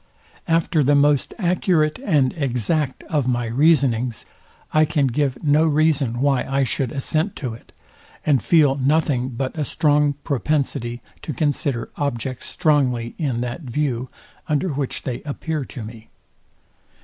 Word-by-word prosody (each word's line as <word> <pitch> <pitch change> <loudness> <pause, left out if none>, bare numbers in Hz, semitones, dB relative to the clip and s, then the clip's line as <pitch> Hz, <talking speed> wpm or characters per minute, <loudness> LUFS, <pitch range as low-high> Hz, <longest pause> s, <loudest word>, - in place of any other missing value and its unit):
After 165 -2 +2
the 145 +2 +4
most 145 -1 +3
accurate 175 -4 +1
and 145 - +2
exact 135 0 -1
of 145 -5 -1
my 120 -1 0
reasonings, 125 -2 +2 0.5
I 155 - +5
can 150 -2 +1
give 135 +1 0
no 155 +2 +4
reason 145 -6 +1
why 140 -2 +3
I 135 +1 0
should 130 0 -2
assent 155 +7 -1
to 125 -6 -4
it; 115 - -14 0.5
and 140 -5 +3
feel 150 -2 +4
nothing 135 -2 +1
but 130 +3 -4
a 155 - -1
strong 150 -1 +2
propensity 130 -4 -1 0.2
to 155 - -5
consider 140 -5 -1
objects 130 -3 -3
strongly 125 -6 +1
in 130 -7 -1
that 125 +6 -4
view, 130 -2 -2 0.4
under 150 +5 +1
which 140 -3 -3
they 125 -3 -4
appear 150 0 -4
to 125 - -8
me. 110 +1 -11
140 Hz, 140 wpm, -22 LUFS, 125-155 Hz, 0.5 s, I